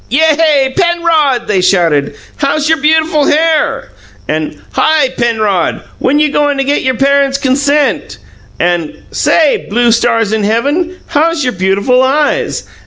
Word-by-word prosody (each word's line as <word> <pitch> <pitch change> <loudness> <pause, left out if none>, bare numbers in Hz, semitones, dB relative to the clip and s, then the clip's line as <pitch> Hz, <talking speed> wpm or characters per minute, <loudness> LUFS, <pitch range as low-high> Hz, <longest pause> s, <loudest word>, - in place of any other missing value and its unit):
"Yay, 300 -1 +2
Penrod!" 335 -7 +1
they 195 -3 +1
shouted. 165 -7 +1 0.2
"How's 295 +1 -1
your 320 -1 +1
beautiful 310 0 +1
hair?" 310 - 0 0.4
And, 155 -1 -3
"Hi, 310 -4 +1
Penrod! 220 -7 -1 0.2
When 280 +3 +1
you 300 -1 +1
goin' 290 -1 0
to 275 - 0
get 285 +2 0
your 260 -1 -1
parents' 275 +1 +1
consent?" 280 +2 0 0.4
And, 175 -3 -2
"Say, 315 -4 +1
blue 235 +3 +2
stars 225 -1 +1
in 220 -1 -1
heaven, 290 - -1
how's 320 +1 0
your 250 -1 -1
beautiful 200 +7 +1
eyes?" 295 - 0
275 Hz, 135 wpm, -11 LUFS, 225-305 Hz, 0.4 s, Yay